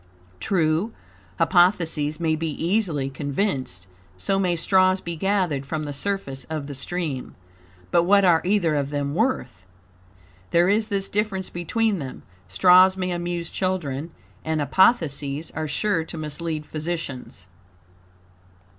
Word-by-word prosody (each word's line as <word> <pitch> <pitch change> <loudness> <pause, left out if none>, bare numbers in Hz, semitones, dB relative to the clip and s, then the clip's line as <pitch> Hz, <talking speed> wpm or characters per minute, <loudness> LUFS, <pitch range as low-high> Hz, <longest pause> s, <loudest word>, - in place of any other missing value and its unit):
True, 165 - +1 0.4
hypotheses 165 -5 +2
may 160 -2 +1
be 160 +1 -2
easily 165 -3 0
conceived; 135 - -3 0.3
so 195 - 0
may 180 -3 +1
straws 185 +2 +3
be 170 -2 -5
gathered 180 -6 0
from 155 +2 -4
the 145 -1 -5
surface 140 -4 -3
of 155 -3 -4
the 145 - -6
stream. 140 -1 -4 0.6
But 170 - +5
what 200 +3 +4
are 170 -3 +5
either 180 -4 +2
of 140 -2 0
them 145 -1 -2
worth? 165 - -1 0.9
There 175 +2 +4
is 215 +2 +2
this 195 -2 -2
difference 200 -3 -2
between 205 +4 0
them 130 -3 -7 0.2
straws 180 - +6
may 185 -1 -2
amuse 175 -1 -3
children, 165 -6 -2 0.3
and 160 0 -1
hypotheses 145 - +2
are 155 0 -3
sure 180 +2 0
to 165 - -8
mislead 155 0 -4
physicians." 155 - -5
165 Hz, 130 wpm, -24 LUFS, 145-190 Hz, 0.9 s, straws